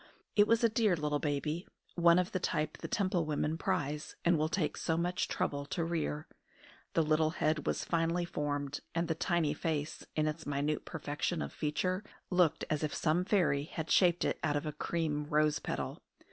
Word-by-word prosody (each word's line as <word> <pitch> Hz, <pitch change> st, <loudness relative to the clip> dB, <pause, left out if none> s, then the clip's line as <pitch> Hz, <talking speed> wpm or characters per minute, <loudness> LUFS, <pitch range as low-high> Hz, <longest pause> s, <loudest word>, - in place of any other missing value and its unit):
It 205 Hz, 0 st, +6 dB
was 230 Hz, +1 st, +3 dB
a -, -, +7 dB
dear 215 Hz, -4 st, +3 dB
little 150 Hz, -2 st, -1 dB
baby, 150 Hz, +4 st, -2 dB, 0.3 s
one 170 Hz, 0 st, +5 dB
of 180 Hz, 0 st, +1 dB
the 185 Hz, -, -1 dB
type 155 Hz, -3 st, -1 dB
the -, -, -5 dB
Temple 185 Hz, -5 st, +1 dB
women 155 Hz, 0 st, -1 dB
prize, 150 Hz, -1 st, -2 dB
and 175 Hz, 0 st, +5 dB
will 155 Hz, 0 st, +1 dB
take 160 Hz, -2 st, 0 dB
so 160 Hz, -, 0 dB
much 175 Hz, +1 st, 0 dB
trouble 140 Hz, 0 st, -1 dB
to 170 Hz, -, -1 dB
rear. 160 Hz, -2 st, -2 dB, 0.7 s
The 165 Hz, -, +4 dB
little 155 Hz, 0 st, +3 dB
head 155 Hz, -1 st, 0 dB
was -, -, 0 dB
finely 170 Hz, +1 st, +1 dB
formed, 145 Hz, -3 st, -2 dB, 0.2 s
and 170 Hz, 0 st, +1 dB
the 160 Hz, -, +1 dB
tiny 160 Hz, -2 st, +1 dB
face, 155 Hz, -1 st, -2 dB
in 155 Hz, 0 st, +2 dB
its 155 Hz, 0 st, -4 dB
minute 145 Hz, +1 st, -1 dB
perfection 155 Hz, +2 st, -2 dB
of -, -, -6 dB
feature, 185 Hz, +6 st, -1 dB, 0.3 s
looked 180 Hz, -4 st, +3 dB
as 150 Hz, -, 0 dB
if 150 Hz, -, -1 dB
some 170 Hz, +3 st, +1 dB
fairy 165 Hz, -9 st, +2 dB
had 160 Hz, 0 st, -5 dB
shaped 175 Hz, -2 st, +4 dB
it -, -, 0 dB
out 150 Hz, -2 st, +1 dB
of 145 Hz, -, -1 dB
a 150 Hz, -, -3 dB
cream 155 Hz, -3 st, -1 dB
rose 150 Hz, 0 st, +2 dB
petal. -, -, -4 dB
155 Hz, 190 wpm, -33 LUFS, 150-175 Hz, 0.7 s, a